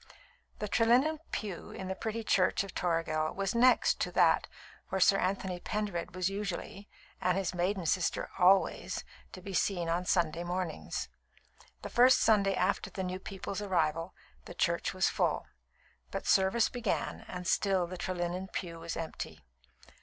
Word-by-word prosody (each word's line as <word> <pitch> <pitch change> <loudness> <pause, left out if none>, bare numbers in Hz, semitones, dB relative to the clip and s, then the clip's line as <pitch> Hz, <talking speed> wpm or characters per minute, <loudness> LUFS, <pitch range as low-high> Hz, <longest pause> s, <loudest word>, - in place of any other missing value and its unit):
The 210 - -3
Trelinnen 245 +9 +3
pew 200 -5 -5
in 190 - -7
the 190 - -1
pretty 220 +3 -4
church 195 -2 +2
of 195 - -9
Toragel 165 -3 0
was 195 -1 -1
next 250 +2 +4
to - - -1
that - - +4 0.4
where 190 - -1
Sir 195 +1 +5
Anthony 185 -1 -1
Pendered 200 -4 -3
was 185 -1 0
usually 200 +1 -5 0.3
(and 180 0 +2
his 195 -2 -1
maiden 180 +1 -1
sister 175 +2 0
always) 190 +1 +3 0.3
to 185 - -9
be 195 -1 -6
seen 175 -1 0
on 175 +2 0
Sunday 170 -2 +1
mornings. 175 - -3 0.8
The - - -5
first 250 +2 +6
Sunday 200 -3 +4
after 185 +2 0
the 190 - -4
new 185 0 -3
people's 195 +1 -5
arrival, 165 -3 0 0.3
the - - -9
church - - +1
was - - +3
full; - - 0 0.6
but - - -5
service 195 +4 +4
began, 235 -5 -2
and 180 0 -6
still 190 -2 +2
the 180 +2 -7
Trelinnen 180 0 -3
pew 170 -3 -5
was 165 0 -5
empty. 165 -1 -6
185 Hz, 155 wpm, -31 LUFS, 175-200 Hz, 0.8 s, first